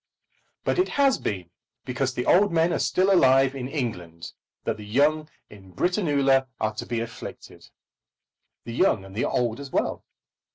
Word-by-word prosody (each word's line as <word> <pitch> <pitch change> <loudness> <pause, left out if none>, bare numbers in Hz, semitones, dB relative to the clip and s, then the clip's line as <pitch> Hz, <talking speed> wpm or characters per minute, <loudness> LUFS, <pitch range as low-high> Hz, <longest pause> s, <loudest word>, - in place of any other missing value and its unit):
But - - 0
it 365 - +2
has 275 -2 +4
been 90 -4 -4 0.3
because 130 +1 -2
the 125 - -2
old 200 +2 +4
men 165 +1 +2
are - - 0
still 190 +2 +2
alive 135 -5 +5
in 130 -2 -5
England 90 - -5 0.3
that - - -2
the 105 - -9
young 150 +8 +1 0.2
in 95 -3 -16
Britannula 140 - +2
are 110 0 -1
to 110 - -6
be 120 -1 -2
afflicted, 115 0 -9 0.9
the 115 - -7
young 115 - +2
and 95 - -12
the 115 - 0
old 120 -1 -1
as 140 -1 -8
well. - - -1
130 Hz, 165 wpm, -25 LUFS, 110-155 Hz, 0.9 s, alive